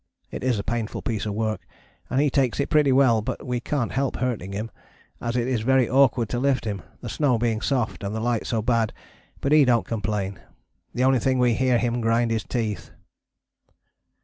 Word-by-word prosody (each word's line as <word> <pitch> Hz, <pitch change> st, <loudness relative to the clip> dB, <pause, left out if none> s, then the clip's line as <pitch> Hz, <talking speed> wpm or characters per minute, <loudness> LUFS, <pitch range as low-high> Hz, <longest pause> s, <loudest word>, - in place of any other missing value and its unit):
It -, -, -6 dB
is 125 Hz, -3 st, +1 dB
a 100 Hz, -, -3 dB
painful 115 Hz, -1 st, -3 dB
piece 110 Hz, -2 st, -2 dB
of 100 Hz, -, -3 dB
work 110 Hz, 0 st, -1 dB, 0.5 s
and 130 Hz, -, +1 dB
he 145 Hz, -1 st, +2 dB
takes 130 Hz, -3 st, +1 dB
it 140 Hz, -, -1 dB
pretty 150 Hz, -3 st, +4 dB
well, 130 Hz, -4 st, +4 dB
but 105 Hz, -, -5 dB
we 125 Hz, -1 st, -1 dB
can't 125 Hz, 0 st, -2 dB
help 135 Hz, 0 st, -1 dB
hurting 115 Hz, -7 st, -2 dB
him, 105 Hz, +3 st, -4 dB, 0.5 s
as 115 Hz, 0 st, -2 dB
it 120 Hz, 0 st, 0 dB
is 125 Hz, -4 st, 0 dB
very 130 Hz, +1 st, +3 dB
awkward 130 Hz, -3 st, +3 dB
to 120 Hz, -, -1 dB
lift 135 Hz, -2 st, +1 dB
him, 100 Hz, -4 st, -3 dB, 0.2 s
the -, -, -6 dB
snow 140 Hz, -6 st, +1 dB
being 115 Hz, -1 st, 0 dB
soft 125 Hz, -6 st, -1 dB
and 100 Hz, +2 st, -3 dB
the -, -, -2 dB
light 115 Hz, 0 st, -1 dB
so 115 Hz, -3 st, -1 dB
bad, 115 Hz, -2 st, +1 dB, 0.5 s
but 140 Hz, -, 0 dB
he 150 Hz, -1 st, +7 dB
dont 120 Hz, -3 st, +3 dB
complain. 100 Hz, -3 st, -3 dB, 0.6 s
The 125 Hz, -, +1 dB
only 130 Hz, -1 st, +4 dB
thing 130 Hz, +3 st, +1 dB
we 125 Hz, -1 st, +3 dB
hear 125 Hz, +1 st, +2 dB
him 120 Hz, 0 st, -1 dB
grind 115 Hz, +1 st, +2 dB
his 110 Hz, -2 st, 0 dB
teeth. 110 Hz, -5 st, -3 dB
120 Hz, 205 wpm, -24 LUFS, 110-130 Hz, 0.6 s, he